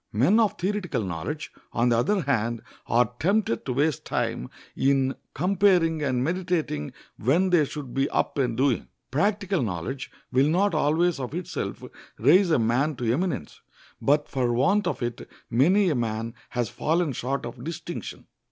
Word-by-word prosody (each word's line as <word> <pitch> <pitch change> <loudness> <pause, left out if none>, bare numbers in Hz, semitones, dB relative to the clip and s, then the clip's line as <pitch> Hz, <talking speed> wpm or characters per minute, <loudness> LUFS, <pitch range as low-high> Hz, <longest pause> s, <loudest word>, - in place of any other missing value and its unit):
Men 140 - +4
of 220 -3 +2
theoretical 180 - -1
knowledge, 95 - -4 0.2
on 120 +1 +2
the 115 - +3
other 200 - +1
hand, 120 -4 0 0.2
are 120 +1 +2
tempted 195 - +1
to 130 - 0
waste 145 +2 +1
time - - -2 0.3
in 135 -1 +2 0.2
comparing 180 -2 +3
and 130 -3 0
meditating 170 - -1 0.2
when 170 - +2
they 165 -4 +5
should 140 -3 -7
be 135 +1 +1
up - - 0
and 120 -4 0
doing. 130 -2 +1 0.2
Practical 195 - +1
knowledge 115 +6 -3 0.2
will 130 +3 +3
not 195 +4 +2
always 155 +2 +2
of 130 +3 -4
itself 180 0 -4 0.3
raise 175 - +5
a 160 - +4
man 125 +6 +1
to 120 -2 0
eminence, 160 - -3 0.4
but 145 +1 +2
for 125 -3 0
want 195 - +2
of - - -2
it 120 0 -4 0.2
many 175 - +4
a - - +2
man 115 -1 -2 0.2
has 120 -2 -1
fallen 160 - 0
short 135 +4 -2
of 120 +1 -8
distinction. 165 +2 -6
140 Hz, 160 wpm, -26 LUFS, 120-175 Hz, 0.4 s, they